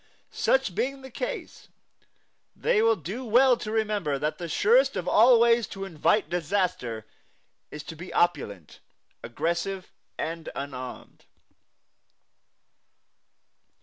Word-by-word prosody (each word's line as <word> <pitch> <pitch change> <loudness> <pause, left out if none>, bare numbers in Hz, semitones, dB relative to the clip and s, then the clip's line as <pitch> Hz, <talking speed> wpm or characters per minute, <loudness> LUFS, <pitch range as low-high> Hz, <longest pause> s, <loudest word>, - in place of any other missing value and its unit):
Such 265 -8 +1
being 270 +7 -2
the 265 - -10
case, - - -6 0.9
they 210 - +2
will 225 0 +4
do 195 - -6
well 250 +2 +5
to 215 - -6
remember 210 -9 0
that 150 +2 -2
the 170 -1 -5
surest 465 - +3
of - - -3
all 235 +2 +6
ways 235 -1 +4
to 195 0 -6
invite 195 +4 +1
disaster 165 - -2 0.6
is 150 - -8
to 160 - -8
be 175 +4 -9
opulent, 100 - -1 0.4
aggressive 170 +9 -3 0.3
and 165 0 -4
unarmed. 130 -2 -7
190 Hz, 115 wpm, -26 LUFS, 155-230 Hz, 0.9 s, all